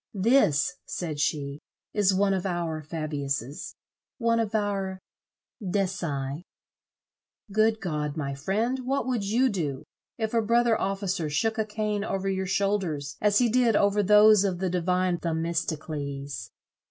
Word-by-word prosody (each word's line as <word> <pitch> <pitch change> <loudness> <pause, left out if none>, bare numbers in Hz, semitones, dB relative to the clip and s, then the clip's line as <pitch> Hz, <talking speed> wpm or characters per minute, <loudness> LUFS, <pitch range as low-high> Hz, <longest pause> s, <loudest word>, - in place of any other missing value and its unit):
"This," 185 - +3
said 155 -5 -4
she, 145 -1 -1 0.3
"is 205 -2 +3
one 195 +1 +2
of 190 -2 -1
our 170 -4 -2
Fabiuses, 145 -4 -4 0.4
one 230 -2 +2
of 225 -1 -1
our 200 -3 -1 0.7
Decii. 175 -7 -2 1.1
Good 220 +1 +3
God, 150 -4 -3
my 140 -2 -2
friend, 210 - -1
what 265 +2 -1
would 250 -5 -1
you 230 +6 +2
do, 155 - -2 0.3
if 220 -1 -2
a 230 - +3
brother 235 +1 +3
officer 195 -5 -1
shook 220 +9 0
a 220 - +1
cane 210 -1 -2
over 195 -2 -2
your 190 -1 -1
shoulders 185 -8 -1
as 205 -1 +4
he 245 - +4
did 235 -1 +3
over 205 0 +3
those 210 +1 +6
of 190 -3 0
the 185 0 -1
divine 180 0 +1
Themistocles? 155 - -3
190 Hz, 140 wpm, -27 LUFS, 155-210 Hz, 1.1 s, those